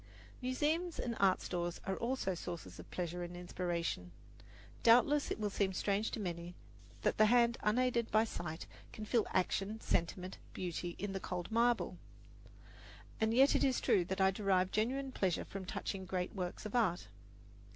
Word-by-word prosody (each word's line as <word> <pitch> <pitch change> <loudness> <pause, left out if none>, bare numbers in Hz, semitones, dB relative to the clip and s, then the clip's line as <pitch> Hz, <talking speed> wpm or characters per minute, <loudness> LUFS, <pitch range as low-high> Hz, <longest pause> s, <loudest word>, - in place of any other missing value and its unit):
Museums 310 +7 0
and 235 -1 -2
art 195 -2 +4
stores 175 -1 -2
are 190 - -1
also 235 -5 -1
sources 175 -1 -6
of - - -10
pleasure 175 0 -3
and 175 0 -6
inspiration. 175 - -3 0.7
Doubtless 250 +5 +5
it - - -2
will 210 -1 -1
seem 195 -1 +1
strange 200 +3 0
to - - -4
many 175 -2 -4 0.5
that - - +2
the 215 - +7
hand 235 0 +5
unaided 235 +1 +2
by 215 +1 +4
sight 170 -7 -5 0.3
can 215 - -7
feel 225 +1 +2
action, 195 +4 0
sentiment, 180 -1 -1
beauty 175 -1 -4
in 200 -1 -3
the 195 - -2
cold 180 +1 -4
marble; 235 +1 +2 1.2
and 220 -1 +2
yet 265 +4 +5
it - - +3
is 260 -2 +3
true 185 - +3
that 190 +2 -3
I 190 0 +5
derive 190 -2 +1
genuine 265 +5 0
pleasure 190 -8 0
from 195 -1 -6
touching 190 +1 -4
great 180 -1 -2
works 180 0 -4
of 215 - -5
art. 190 -7 +2
195 Hz, 165 wpm, -35 LUFS, 180-235 Hz, 1.2 s, the